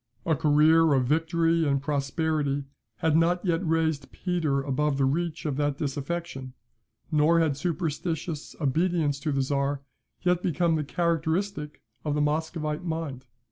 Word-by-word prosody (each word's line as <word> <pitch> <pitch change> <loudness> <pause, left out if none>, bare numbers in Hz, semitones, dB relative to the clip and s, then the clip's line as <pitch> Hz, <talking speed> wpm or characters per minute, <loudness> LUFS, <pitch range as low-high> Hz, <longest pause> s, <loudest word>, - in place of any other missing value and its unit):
A 160 - +2
career 155 +1 +5
of 130 -2 +2
victory 165 +3 +2
and 140 -1 +2
prosperity 145 0 -1 0.3
had 155 +8 +1
not 175 +3 +2
yet 170 0 +1
raised 160 -4 0
Peter 160 -7 -1
above 145 +1 0
the 135 - +3
reach 165 +4 -1
of 145 -3 -1
that 145 -1 0
disaffection, 140 -2 -4 0.6
nor 155 +2 +4
had 160 -4 +2
superstitious 160 0 -3
obedience 155 0 +1
to 155 - -2
the 135 -1 +1
Czar 140 0 -1 0.4
yet 180 -1 +2
become 170 -1 +1
the 155 -1 0
characteristic 165 +1 -1 0.2
of 150 -1 -1
the 150 - +1
Muscovite 155 +1 -1
mind. 160 -7 -4
155 Hz, 140 wpm, -27 LUFS, 140-165 Hz, 0.6 s, career